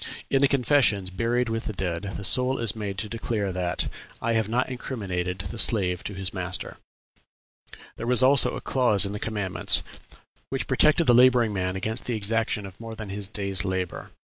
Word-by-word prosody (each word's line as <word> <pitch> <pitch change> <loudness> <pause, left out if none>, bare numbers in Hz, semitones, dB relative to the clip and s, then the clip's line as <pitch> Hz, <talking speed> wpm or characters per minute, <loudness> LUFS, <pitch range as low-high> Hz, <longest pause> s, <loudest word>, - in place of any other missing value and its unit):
In 135 - +3
the 140 - +5
confessions, 125 -8 +2
buried 120 +5 0
with 115 0 -3
the 110 - -4
dead, 95 +1 -3
the 100 - -7
soul 130 +5 +3
is 115 -3 0
made 100 -3 -5
to 110 - -3
declare 110 -3 -3
that 90 -1 -2 0.3
"I 115 - -1
have 110 -2 0
not 125 +3 0
incriminated 95 -9 -4
the 105 +4 -6
slave 90 -7 +1
to 100 - -5
his 95 -1 -2
master," 90 -1 -3 1.2
There 115 - -5
was 125 +1 +6
also 135 +1 +5
a - - -6
clause 120 -7 +4
in 100 - -4
the 105 - -5
commandments 100 -5 0 0.7
"which - - -3
protected 155 +2 +4
the 120 - +5
laboring 120 -3 +5
man 90 -1 -2
against 110 +5 -3
the 120 - -1
exaction 110 0 -1
of 95 -2 -12
more 115 -1 -8
than 110 -2 -8
his 100 0 -3
day's 100 -3 -2
labor." 95 -1 -4
105 Hz, 190 wpm, -25 LUFS, 95-120 Hz, 1.2 s, was